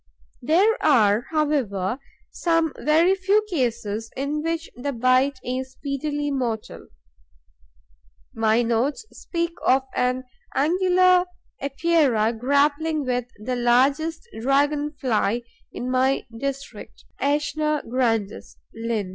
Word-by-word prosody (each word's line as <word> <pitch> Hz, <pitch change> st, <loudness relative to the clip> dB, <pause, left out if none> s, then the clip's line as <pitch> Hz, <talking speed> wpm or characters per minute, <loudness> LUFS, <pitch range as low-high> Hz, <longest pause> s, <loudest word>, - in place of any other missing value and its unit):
There 385 Hz, -, +2 dB
are, 215 Hz, +1 st, +4 dB
however, 270 Hz, -, 0 dB, 0.3 s
some 330 Hz, -3 st, +1 dB
very 325 Hz, +5 st, +4 dB
few 395 Hz, +3 st, +2 dB
cases 230 Hz, -, -2 dB
in 285 Hz, +3 st, -2 dB
which 330 Hz, +1 st, -2 dB
the 280 Hz, +4 st, -4 dB
bite 255 Hz, +3 st, +2 dB
is 260 Hz, +1 st, -4 dB
speedily 290 Hz, +1 st, -3 dB
mortal. 240 Hz, -5 st, -3 dB, 1.5 s
My 225 Hz, +1 st, +2 dB
notes 235 Hz, -, 0 dB
speak 340 Hz, -1 st, -3 dB
of 265 Hz, +1 st, +3 dB
an 250 Hz, +1 st, 0 dB, 0.3 s
Angular 365 Hz, +3 st, +4 dB, 0.4 s
Epeira 275 Hz, -6 st, +2 dB
grappling 285 Hz, +5 st, +1 dB
with 250 Hz, -1 st, -1 dB, 0.2 s
the 255 Hz, 0 st, -1 dB
largest 275 Hz, -, +2 dB
Dragon 285 Hz, +4 st, +1 dB
fly 240 Hz, -4 st, 0 dB, 0.3 s
in 250 Hz, +1 st, -4 dB
my 260 Hz, +1 st, +1 dB
district 275 Hz, +3 st, -6 dB, 0.2 s
(AEshna 300 Hz, +1 st, 0 dB
grandis, 225 Hz, -4 st, -1 dB, 0.2 s
LIN.). 225 Hz, -4 st, -3 dB
275 Hz, 105 wpm, -23 LUFS, 240-310 Hz, 1.5 s, are